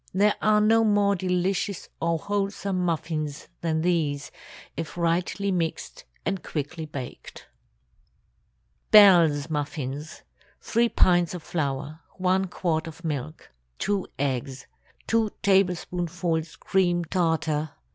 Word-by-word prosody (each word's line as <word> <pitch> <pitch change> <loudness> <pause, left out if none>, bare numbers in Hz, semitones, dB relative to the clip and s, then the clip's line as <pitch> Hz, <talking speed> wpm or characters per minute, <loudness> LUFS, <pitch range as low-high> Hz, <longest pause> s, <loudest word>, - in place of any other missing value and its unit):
There 205 +2 +4
are 215 0 +4
no 225 +2 +4
more 205 -2 +3
delicious 185 +1 -1
or 165 0 +1
wholesome 200 0 -2
muffins 160 -3 -2
than 160 -1 0
these, 150 -5 0 0.4
if 165 0 -6
rightly 175 +4 0
mixed 170 -3 -3 0.2
and 195 -2 -1
quickly 155 +2 -5
baked. 135 -4 -8 1.4
BELLE'S 170 -8 +7
MUFFINS. 145 0 -4 0.4
3 235 +1 +1
pints 175 -3 +3
of 170 - -7
flour. 145 -1 -3 0.2
1 185 +1 +2
quart 165 -2 -1
of 165 +2 -10
milk. 155 0 -5 0.3
2 200 -2 -1
eggs. 135 -1 -2 0.4
2 225 -1 +2
tablespoonfuls 175 -3 0
cream 175 -3 +1
tartar. 160 -3 0
170 Hz, 105 wpm, -26 LUFS, 155-190 Hz, 1.4 s, BELLE'S